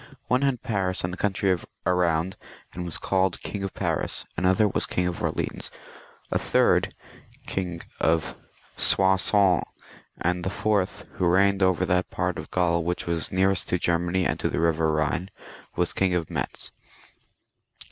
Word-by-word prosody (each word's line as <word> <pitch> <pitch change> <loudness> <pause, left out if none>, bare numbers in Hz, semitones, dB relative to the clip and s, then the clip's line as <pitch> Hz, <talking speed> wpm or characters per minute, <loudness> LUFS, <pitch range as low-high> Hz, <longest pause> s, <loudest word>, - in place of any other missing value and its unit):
One 125 +1 +3
had 135 -4 0
Paris 95 -4 0
and 90 +1 -2
the - - -6
country 95 -2 +1 0.3
round, 90 0 +1 0.4
and 90 0 -5
was 85 - -2
called 95 -1 0
King 100 - -5
of 95 -1 -4
Paris, - - -1
another 95 +3 +3
was 100 - 0
King 90 - 0
of 90 -1 -3
Orleans, - - -2 0.6
a - - +2
third - - +2 0.5
King 90 -3 -3 0.2
of 80 0 +1 0.4
Soissons, 95 -1 +4 0.6
and 90 +1 0
the 95 - -1
fourth, 100 -1 -1
who 90 - +2
reigned 100 +2 +3
over 95 -1 +3
that 90 +1 +1
part - - -2
of - - -8
Gktul 85 -2 +1
which 90 +1 -2
was 85 -1 -1
nearest 95 0 +2
to 90 - +2
Germany 85 +2 +1
and - - 0
to - - 0
the - - -2
river 80 -1 +2
Ehine, 80 +4 -1 0.5
was 90 0 +1
King 95 -2 +1
of 85 -3 -2
Metz. - - -4
90 Hz, 155 wpm, -25 LUFS, 85-95 Hz, 0.6 s, Soissons